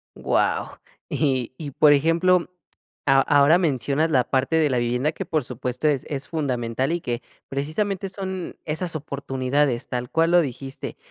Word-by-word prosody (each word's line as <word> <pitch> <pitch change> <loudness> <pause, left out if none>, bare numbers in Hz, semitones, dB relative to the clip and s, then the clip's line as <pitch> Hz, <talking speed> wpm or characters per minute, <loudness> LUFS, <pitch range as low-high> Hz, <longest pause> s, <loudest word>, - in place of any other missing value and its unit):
Guau, - - 0 0.3
y 130 -5 0
y 150 -3 -6
por 145 +2 +5
ejemplo, 170 +5 +3 0.6
a 135 -1 +5
ahora 145 +4 +5
mencionas 145 -1 +1
la 130 -4 +4
parte 135 +4 +1
de 155 -2 +3
la 130 - +1
vivienda 125 +5 0
que - - -6
por 155 -3 0
supuesto 125 +3 -3
es 145 -4 +1
es 140 -1 -4
fundamental 130 -3 -1
y 170 0 -1
que, 120 -3 -3 0.3
precisamente 180 +8 -2
son 190 -2 -5
esas 165 +2 -3
oportunidades, 140 -3 -1
tal 125 0 -3
cual 165 +1 +2
lo 175 0 +6
dijiste. 135 -2 -6
145 Hz, 155 wpm, -23 LUFS, 130-165 Hz, 0.6 s, lo